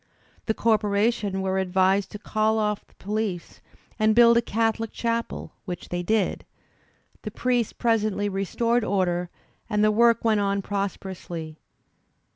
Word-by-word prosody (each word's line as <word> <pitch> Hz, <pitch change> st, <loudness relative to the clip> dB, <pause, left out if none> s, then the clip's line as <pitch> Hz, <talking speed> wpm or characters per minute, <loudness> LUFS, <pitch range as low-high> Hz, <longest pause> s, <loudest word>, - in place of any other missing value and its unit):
The 220 Hz, -, +1 dB
corporation 210 Hz, -2 st, +1 dB
were 190 Hz, 0 st, 0 dB
advised 190 Hz, +1 st, +2 dB
to -, -, -7 dB
call 215 Hz, +1 st, 0 dB
oflF 210 Hz, -1 st, -1 dB
the -, -, -28 dB
police 205 Hz, -3 st, -4 dB, 0.4 s
and 215 Hz, 0 st, +3 dB
build 235 Hz, 0 st, +7 dB
a 235 Hz, -, +4 dB
Catholic 225 Hz, 0 st, -1 dB
chapel, 230 Hz, 0 st, -3 dB
which 180 Hz, -3 st, -6 dB
they 175 Hz, 0 st, -2 dB
did; 210 Hz, +2 st, 0 dB, 0.8 s
the 215 Hz, -, -5 dB
priest 240 Hz, +1 st, -1 dB
presently 215 Hz, -3 st, +1 dB
restored 230 Hz, +5 st, 0 dB
order, 180 Hz, -4 st, 0 dB, 0.4 s
and 210 Hz, -1 st, +1 dB
the 215 Hz, -, +4 dB
work 230 Hz, +1 st, +3 dB
went 220 Hz, -2 st, +3 dB
on 200 Hz, -1 st, 0 dB
pros 200 Hz, 0 st, -2 dB
perously. 170 Hz, -4 st, -7 dB
210 Hz, 140 wpm, -25 LUFS, 190-225 Hz, 0.8 s, build